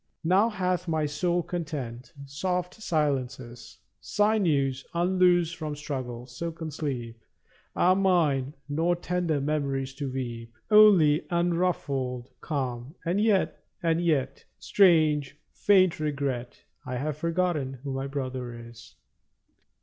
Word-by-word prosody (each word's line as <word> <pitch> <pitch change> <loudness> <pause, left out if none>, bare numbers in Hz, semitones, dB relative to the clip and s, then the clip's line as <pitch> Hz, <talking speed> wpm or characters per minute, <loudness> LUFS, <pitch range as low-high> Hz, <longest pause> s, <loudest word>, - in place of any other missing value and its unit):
Now 190 +7 +4
hath 185 -3 -1
my 160 -2 0
soul 175 +4 0
content. 145 -8 -5
Soft 180 +6 -2
silences, 130 - -3 0.2
Sinews 155 - +1
unloosed 175 -1 +3
from 155 -3 -5
struggle, 130 -5 -5
silken 160 +5 -6
sleep, 125 -6 -4 0.6
27 - - -45
Are 185 +1 +4
mine; 160 -8 +2
nor 165 +4 +1
tender 175 -3 -1
memories 135 -2 -1
to 135 -1 -4
weep. 120 -3 -5 0.2
Only 190 -9 +6
unruffled 155 -8 -1
calm; 130 -2 -4
and 180 +5 +1
yet 210 -3 +1
— - - -38
and 165 0 +1
yet 140 -5 0
— - - -47
Strange, 155 -7 +3 0.2
faint 185 -5 +3
regret 140 -5 -3
— - - -49
I 130 -3 -5
have 145 +4 -2
forgotten 165 -4 -1
who 140 -2 -4
my 135 +1 -3
brother 130 -3 -4
is! 115 0 -12
150 Hz, 125 wpm, -27 LUFS, 130-175 Hz, 0.6 s, Only